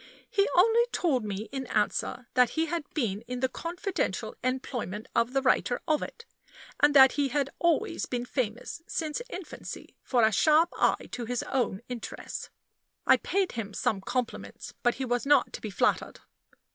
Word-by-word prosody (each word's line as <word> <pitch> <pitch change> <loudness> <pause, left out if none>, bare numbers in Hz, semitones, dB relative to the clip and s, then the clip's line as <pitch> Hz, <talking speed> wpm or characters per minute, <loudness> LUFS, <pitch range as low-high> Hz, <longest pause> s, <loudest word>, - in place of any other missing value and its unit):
He 400 -1 +3
only 455 +6 +5
told 275 -9 +1
me 210 +1 -4
in 265 -2 -4
answer 225 +4 -1
that 250 -2 +4
he 320 - +3
had 325 -2 -4
been 215 -9 0
in 250 0 -4
the 260 - +2
confidential 365 - -3
employment 245 -5 -3
of 235 +1 +2
the 270 -1 +1
writer 250 -1 +2
of 310 -2 +2
it, 465 - -7 0.5
and 290 0 +4
that 265 -1 +9
he 285 -1 +1
had 275 +1 -1
always 340 -3 +1
been 245 -1 -2
famous 245 +4 -3
since 310 +4 -2
infancy 370 -6 -8
for 245 -3 +2
a 220 - +5
sharp 310 - +4
eye - - +2
to 240 - -4
his 245 +1 -2
own 240 -6 -1
interests. 245 -2 -6 0.6
I - - +7
paid 390 -1 0
him 215 -3 -5
some 195 -3 0
compliments; 250 +3 -4
but 240 0 +2
he 265 - -3
was 245 +2 -1
not 285 -3 +4
to - - -6
be 215 - -4
flattered. 185 - 0
255 Hz, 170 wpm, -28 LUFS, 235-310 Hz, 0.6 s, that